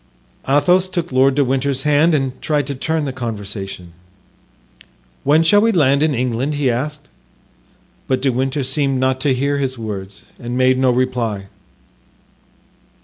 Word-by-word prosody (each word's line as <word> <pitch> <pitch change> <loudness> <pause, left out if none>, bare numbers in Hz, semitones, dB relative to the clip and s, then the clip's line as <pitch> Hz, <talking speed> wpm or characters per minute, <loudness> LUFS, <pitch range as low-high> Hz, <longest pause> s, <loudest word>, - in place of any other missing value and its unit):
Athos 180 +7 +3
took 175 -4 -3
Lord 130 +1 +3
de 140 -1 +2
Winter's 135 +1 -1
hand 150 +2 +3
and 135 -3 -2
tried 150 -3 0
to 140 - -4
turn 155 +3 -2
the 135 - -4
conversation. 100 -7 -6 1.3
"When 150 +4 +4
shall 205 +5 +4
we 225 +1 +3
land 140 -7 +3
in 155 -2 +2
England?" 125 +4 -1
he 140 -3 +1
asked; 145 +4 -4 1.0
but 130 -1 +1
De 135 0 +1
Winter 135 +3 -1
seemed 135 0 0
not 130 0 +1
to 135 -2 +2
hear 140 +2 0
his 130 -2 -2
words 100 -3 -7 0.2
and 120 +1 -4
made 130 0 +3
no 130 -1 +3
reply. 120 -6 -1
135 Hz, 150 wpm, -18 LUFS, 125-145 Hz, 1.3 s, When